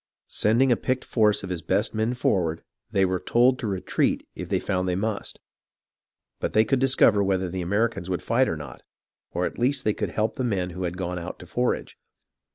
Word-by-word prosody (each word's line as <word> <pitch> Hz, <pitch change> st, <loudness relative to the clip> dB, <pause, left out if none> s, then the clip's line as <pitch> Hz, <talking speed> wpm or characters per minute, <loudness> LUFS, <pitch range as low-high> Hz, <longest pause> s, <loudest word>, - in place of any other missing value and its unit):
Sending 120 Hz, +5 st, +3 dB
a -, -, +6 dB
picked 130 Hz, +2 st, -2 dB
force 105 Hz, -4 st, +2 dB
of 95 Hz, -, -5 dB
his 90 Hz, -2 st, -3 dB
best 100 Hz, +6 st, 0 dB
men 110 Hz, +3 st, 0 dB
forward, 85 Hz, -9 st, 0 dB, 0.3 s
they 95 Hz, -1 st, +2 dB
were 95 Hz, -1 st, 0 dB
told 125 Hz, +5 st, +3 dB
to 115 Hz, -, -3 dB
retreat 95 Hz, -2 st, 0 dB
if -, -, -7 dB
they -, -, +1 dB
found 95 Hz, -2 st, -1 dB
they 90 Hz, -, 0 dB
must; 105 Hz, +2 st, -3 dB, 1.0 s
but -, -, -2 dB
they 110 Hz, +1 st, +5 dB
could 135 Hz, -, +1 dB
discover 125 Hz, -6 st, +4 dB
whether 95 Hz, -1 st, 0 dB
the 95 Hz, +1 st, -4 dB
Americans 100 Hz, +1 st, 0 dB
would 90 Hz, -, -2 dB
fight 125 Hz, +3 st, +2 dB
or 80 Hz, -, -2 dB
not, 75 Hz, -4 st, -9 dB, 0.5 s
or -, -, -1 dB
at -, -, -5 dB
least 130 Hz, +2 st, +1 dB
they 105 Hz, -, +3 dB
could -, -, -3 dB
help 110 Hz, +1 st, -1 dB
the 130 Hz, -, -1 dB
men 95 Hz, -7 st, -1 dB
who 90 Hz, +1 st, -4 dB
had 90 Hz, +1 st, -4 dB
gone 90 Hz, -1 st, -3 dB
out 85 Hz, -, -6 dB
to -, -, -11 dB
forage. 125 Hz, +7 st, -2 dB
100 Hz, 210 wpm, -25 LUFS, 90-120 Hz, 1.0 s, a